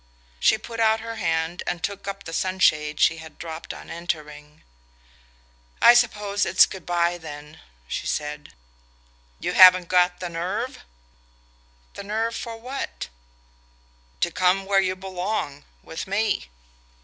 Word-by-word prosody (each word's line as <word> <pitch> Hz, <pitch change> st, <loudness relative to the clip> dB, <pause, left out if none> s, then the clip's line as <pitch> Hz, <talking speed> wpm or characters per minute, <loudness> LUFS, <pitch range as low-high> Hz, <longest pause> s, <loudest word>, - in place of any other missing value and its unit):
She -, -, +4 dB
put 230 Hz, +1 st, -8 dB
out 220 Hz, 0 st, +3 dB
her 230 Hz, 0 st, -6 dB
hand 165 Hz, -2 st, -1 dB
and 175 Hz, -2 st, -3 dB
took 200 Hz, 0 st, -4 dB
up 195 Hz, 0 st, -5 dB
the 165 Hz, -, -8 dB
sunshade 155 Hz, -5 st, +1 dB
she 160 Hz, -, +4 dB
had 160 Hz, -1 st, -11 dB
dropped 160 Hz, -1 st, -7 dB
on -, -, -10 dB
entering. 150 Hz, -3 st, -6 dB, 1.2 s
"I 240 Hz, -, +8 dB
suppose 210 Hz, -4 st, +1 dB
it's 185 Hz, -, +6 dB
good 190 Hz, -, -10 dB
bye 175 Hz, 0 st, +1 dB
then," 150 Hz, -1 st, -10 dB, 0.3 s
she -, -, -4 dB
said. 150 Hz, 0 st, -4 dB, 0.9 s
"You -, -, -2 dB
haven't 185 Hz, -2 st, +8 dB
got 180 Hz, 0 st, +3 dB
the 180 Hz, -, -4 dB
nerve?" 185 Hz, +9 st, -3 dB, 1.1 s
"The -, -, -8 dB
nerve 225 Hz, +3 st, -2 dB
for 230 Hz, -2 st, -6 dB
what?" 250 Hz, -, -6 dB, 1.1 s
"To -, -, +1 dB
come 185 Hz, +1 st, +2 dB
where 195 Hz, 0 st, +3 dB
you 185 Hz, -1 st, -1 dB
belong: 185 Hz, -6 st, -4 dB, 0.2 s
with 160 Hz, +3 st, -6 dB
me." 200 Hz, -, 0 dB
185 Hz, 135 wpm, -24 LUFS, 160-205 Hz, 1.2 s, I